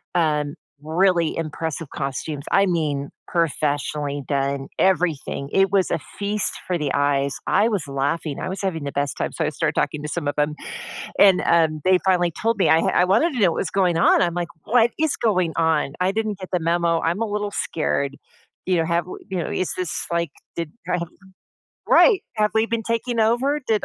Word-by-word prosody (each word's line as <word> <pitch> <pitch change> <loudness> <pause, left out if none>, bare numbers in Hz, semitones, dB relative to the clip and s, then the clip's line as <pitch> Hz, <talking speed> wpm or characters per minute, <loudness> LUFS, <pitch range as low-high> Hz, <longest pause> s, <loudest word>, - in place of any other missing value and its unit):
um 150 -4 +1 0.3
really 170 0 +2
impressive 160 -1 -4
costumes, 140 +1 -4
I 195 - +5
mean, 150 -6 -1 0.2
professionally 145 -3 -1
done 140 -1 -1
everything 165 -6 +1
it 195 0 +3
was 195 -2 +2
a - - +1 0.2
feast 205 0 -1
for 180 - 0
the 145 -2 -1
eyes, 140 -1 +1
I 220 +3 +3
was 190 -10 -2
laughing, 140 +2 -2
I - - -3
was 190 - -5
having 165 -6 -2
the 140 - -3
best 140 0 -1
time, - - -2
so - - -1
I - - +1
started - - -1
talking 150 - -1
to 150 - -4
some 145 0 -3
of 145 - 0
'em, 150 +1 +1 0.6
and, 195 -2 +6
um, 160 -2 +3
they 185 0 +5
finally 175 -2 +3
told 225 +4 0
me - - +3
I 160 - +5
ha - - -1
I - - +5
wanted 275 - +2
to 245 - -2
know 190 -4 +5
what - - -5
was - - -5
going 180 -4 +2
on, - - +5
I'm 170 -1 +1
like, 175 -1 -2 0.2
"What 235 0 +3
is 315 -2 +1
going 185 -7 +1
on? 160 -4 +1
I 185 +1 +2
didn't 215 -2 -2
get 185 - -8
the 180 - +1
memo, 170 0 +1
I'm 170 +6 0
a - - 0
little 210 -1 -2
scared," 140 -6 -1 0.5
you 185 -1 +2
know, 165 -1 +1
"have 170 +1 0
we" - - -8
you 185 - -2
know, - - -4
"is 185 - -1
this 180 -3 -3
like 170 -3 0 0.3
did" 165 -2 -4 0.2
right 175 - 0 0.9
right! 425 -6 +6
"Have 210 0 +2
we 220 0 +4
been 230 0 -2
taking 230 +1 -1
over? 255 +7 +2
Did 215 -2 +1
170 Hz, 205 wpm, -22 LUFS, 150-195 Hz, 0.9 s, and